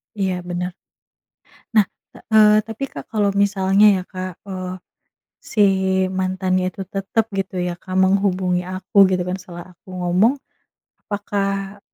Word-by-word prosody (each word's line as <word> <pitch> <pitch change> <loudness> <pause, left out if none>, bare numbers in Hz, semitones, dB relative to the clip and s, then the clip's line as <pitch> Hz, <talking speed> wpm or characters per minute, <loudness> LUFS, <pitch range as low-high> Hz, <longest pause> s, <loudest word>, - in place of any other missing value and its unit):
Iya 190 -3 -1
bener. 180 0 -3 1.0
Nah, 210 -3 +6 0.5
eee, 215 -1 +7
tapi 225 +5 -5
Kak - - -9
kalau 205 -2 +2
misalnya 200 0 +3 0.2
ya - - -9
Kak, 185 -2 -6
eee, 185 -1 -4 0.7
si 210 - -1 0.6
mantannya 185 0 0
itu 195 - -8
tetap 195 +3 -1
gitu 190 -1 -2
ya, 180 0 -1
Kak 185 +1 -8
menghubungi 185 -2 +2
aku 185 +2 +3
gitu 180 -1 +1
kan 180 - -1
setelah 175 0 -11
aku 180 - -20
ngomong. 190 +10 +2 0.7
Apakah 200 -1 -3
190 Hz, 130 wpm, -21 LUFS, 185-200 Hz, 1.0 s, eee